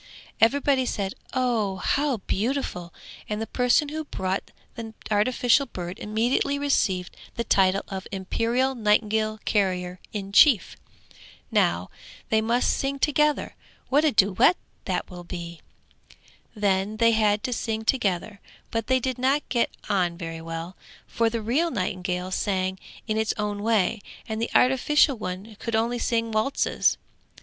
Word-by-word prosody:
Everybody 265 +2 +3
said, 195 -4 -2 0.2
'Oh, 230 -6 +1
how 275 +7 0
beautiful!' 210 -6 -2 0.4
And 210 0 -2
the 220 - -2
person 250 +5 +2
who 315 +1 -4
brought 190 -9 -3 0.2
the 225 -2 -8 0.2
artificial 245 +5 +3
bird 175 0 -6
immediately 235 +6 0
received 200 -11 0 0.2
the 235 - -1
title 195 -3 +3
of 190 -1 -6
Imperial 230 +7 0
Nightingale 215 -1 +1
Carrier 185 -3 0
in 200 -2 -5
Chief. 225 - +5 0.8
'Now, 85 +1 +1 0.4
they 220 0 +4
must 235 +3 +2
sing 275 0 -2
together; 300 +1 +1 0.4
what 290 +3 +4
a 310 - +4
duet 215 - +4 0.3
that - - -2
will 175 -1 -8
be.' 170 -2 -7 0.9
Then 200 0 0
they 230 0 +5
had 210 -2 +2
to 250 - -1
sing 220 -1 -3
together, 205 -4 0 0.3
but 225 -1 -2
they 260 0 +3
did 255 0 -3
not 270 +3 +1
get 240 -3 +1 0.2
on 180 -4 +1
very 165 -2 -6
well, 165 +2 -6 0.3
for 230 -1 +1
the 225 -1 -3
real 285 +10 +1
nightingale 185 - -2
sang 190 -1 -1 0.3
in 215 -1 -1
its 220 0 0
own 210 -1 -2
way, 220 -1 +1 0.3
and 220 0 -3
the 230 - -1
artificial 265 +3 +4
one 200 +1 -6
could 230 -1 -2
only 235 +2 0
sing 230 -1 0
waltzes. 215 +6 +1
220 Hz, 140 wpm, -25 LUFS, 190-250 Hz, 0.9 s, Chief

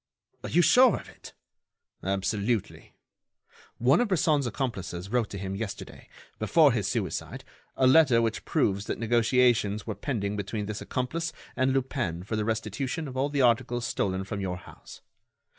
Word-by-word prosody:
"Are - - -5
you 175 +2 +4
sure 250 +4 +6
of - - -8
it?" - - -13 0.7
"Absolutely. 100 +3 -2 0.8
One 130 - +4
of 245 - +1
Bresson's 155 -7 +2
accomplices 95 -8 -4
wrote 120 -3 +1
to 100 - -6
him 95 0 -4
yesterday, 105 0 -7 0.3
before - - +4
his - - -1
suicide, - - -3 0.3
a 130 - +3
letter 130 -3 +6
which 115 -1 -1
proves 100 0 0
that - - -2
negotiations 115 -2 +2
were 110 - -3
pending 105 -1 -3
between 105 +1 -3
this 105 +1 -5
accomplice 155 +6 -3 0.2
and 130 +1 +2
Lupin 125 - -2
for 105 +3 -4
the 105 -1 -1
restitution 115 - -3
of 130 - -8
all 135 +2 0
the 140 -2 +1
articles 120 0 +2
stolen 95 -4 -1
from 100 +1 -5
your 90 -2 -3
house. 90 - -14
115 Hz, 160 wpm, -27 LUFS, 100-130 Hz, 0.8 s, sure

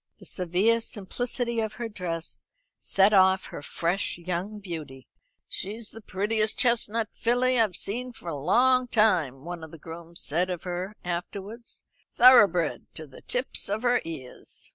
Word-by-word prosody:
The - - -15
severe 190 +6 +1
simplicity 235 +3 -3
of 220 -1 -2
her 235 +1 -4
dress 175 -6 -5 0.3
set 195 +2 +3
off 190 -1 +5
her - - -8
fresh 170 +6 -1
young 180 +4 -4
beauty. 155 -9 -8 0.4
"She's 215 +4 -5
the 225 - -11
prettiest 215 +2 0
chestnut 230 -3 +1
filly 245 +1 +1
I've 215 -6 +2
seen 250 +5 -1
for 200 - -13
a 165 - -2
long 250 - +3
time." 175 - +2
one 175 -1 -6
of 160 - -8
the 165 - -11
grooms 165 +2 -8
said 175 +5 +1
of 180 -3 -4
her 180 +3 -4
afterwards. 195 +6 -5 0.3
"Thoroughbred 210 -10 +5
to 155 - -6
the 135 - -14
tips 250 -4 +1
of 210 +3 -2
her 245 0 +3
ears." 145 -6 -8
195 Hz, 155 wpm, -27 LUFS, 170-230 Hz, 0.4 s, off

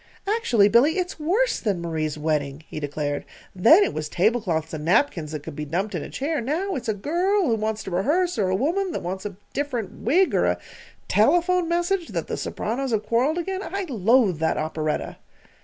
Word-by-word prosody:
"Actually, 395 - +3
Billy, 245 - +4
it's 365 -2 -3
worse 395 +11 +1
than 200 -6 -1
Marie's 155 -3 -2
wedding," 150 -1 -2
he - - -6
declared, 145 0 -3 0.3
"Then 235 - +7
it 395 - -1
was 155 -1 -4
tablecloths 180 -6 0
and 155 -1 -4
napkins 165 - +1
that 155 -2 -5
could - - -8
be 150 - -4
dumped 180 +8 -2
in - - -2
a - - -7
chair. 290 +1 -2
Now 330 - -1
it's 255 -7 -4
a 215 - +1
girl 355 - +1
who 235 - +2
wants 215 -1 -2
to 190 - -7
rehearse, 300 - +1
or 190 -3 +2
a 185 - +1
woman 345 - 0
that - - -4
wants 190 +3 -4
a 200 - -9 0.2
different 260 -7 -3
wig, 350 - +3
or - - +3
a - - +1 0.5
telephone 345 - +3
message 345 +1 0
that - - -3
the - - -3
sopranos 260 +5 -3
have 215 -3 -1
quarrelled 255 +9 +1
again. 375 +2 -3
I 390 +2 -3
loathe 225 - +3
that 160 0 +1
operetta!" 155 0 -2
230 Hz, 200 wpm, -24 LUFS, -, 0.5 s, Then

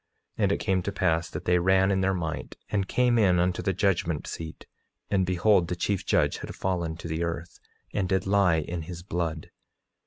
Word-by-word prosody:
9:3 - - +2
And - - +3
it - - +2
came 95 -1 0
to 100 - -3
pass 80 -3 +1
that - - -7
they 90 0 +3
ran 95 +2 +3
in 95 0 +1
their 95 0 +2
might, 80 -3 -4
and 100 -2 0
came 125 +1 +3
in 90 -5 +4
unto 90 0 +1
the 95 - 0
judgment 85 -4 0
seat; 80 -1 -7 0.5
and 95 -3 +2
behold, 90 0 +3
the 90 - -2
chief 95 +2 -1
judge - - +2
had - - -7
fallen 85 -4 -2
to 85 - -7
the 80 +1 -2
earth, 85 0 -5 0.3
and 95 -3 -1
did 95 -1 +1
lie 100 -3 +4
in 85 +2 -4
his 85 +2 -8
blood. 85 -4 -3
90 Hz, 210 wpm, -27 LUFS, 85-95 Hz, 0.5 s, in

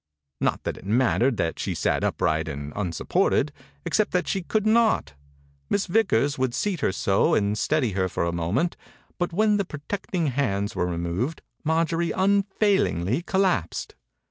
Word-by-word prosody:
Not - - 0
that - - -3
it - - -12
mattered 125 +2 +2
that 80 -1 -1
she - - -2
sat - - 0
upright 80 0 0
and 70 -1 -6
unsupported, 90 -6 +1 0.3
except 215 - +1
that 180 0 +1
she 195 - -1
could 215 +4 -1
not. 220 - +3 0.6
Miss 200 - +1
Vickers 175 -8 +2
would 130 -2 0
seat 200 -5 -1
her 140 - +1
so 95 0 +2
and 105 0 +1
steady 135 -1 +1
her 95 -1 0
for - - -2
a 85 - 0
momerit, 85 - 0 0.4
but 175 - 0
when 210 +3 +3
the 200 - +1
protecting 175 +2 -4
hands 110 -6 -1
were 90 - 0
removed 90 - -2 0.2
Marjorie 165 +2 +1
unfailingly 190 - +1
collapsed. 180 - 0
145 Hz, 155 wpm, -25 LUFS, -, 0.6 s, not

